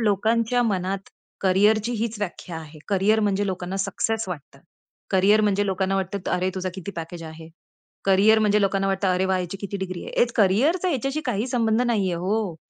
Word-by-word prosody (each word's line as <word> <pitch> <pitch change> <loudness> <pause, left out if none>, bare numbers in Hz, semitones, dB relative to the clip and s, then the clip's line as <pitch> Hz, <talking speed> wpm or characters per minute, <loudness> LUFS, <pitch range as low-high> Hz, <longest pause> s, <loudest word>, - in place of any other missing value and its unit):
लोकांच्या 225 +3 +2
मनात, 195 -3 -1 0.4
करिअरची 210 +4 +3
हीच 230 0 -2
व्याख्या 180 -3 -5
आहे. 155 -1 -10
करिअर 205 +2 +3
म्हणजे 205 -1 +1
लोकांना 185 0 -3
सक्सेस 220 +3 -1
वाटतं, 145 -5 -8 0.5
करिअर 200 +3 +4
म्हणजे 205 -1 +1
लोकांना 190 0 0
वाटतं, 190 0 -3
"अरे, 185 +1 +1
तुझा 185 0 -2
किती 190 +1 -6
पॅकेज 165 +1 -6
आहे?" 160 0 -10 0.6
करिअर 200 +3 +5
म्हणजे 210 -1 +3
लोकांना 195 0 +1
वाटतं, 195 0 0
"अरे 185 +1 +1
वाह! 190 0 +1
याची 180 +2 -4
किती 200 0 -4
डिग्री 185 -2 -5
आहे?" - - -7
एक 240 0 +2
करिअरचा 275 - +3
ह्याच्याशी 275 0 -1
काही 235 -1 -1
संबंध 230 -2 +1
नाहीये. 210 -7 +1
हो. 190 +1 -1
195 Hz, 175 wpm, -24 LUFS, 185-220 Hz, 0.6 s, करिअर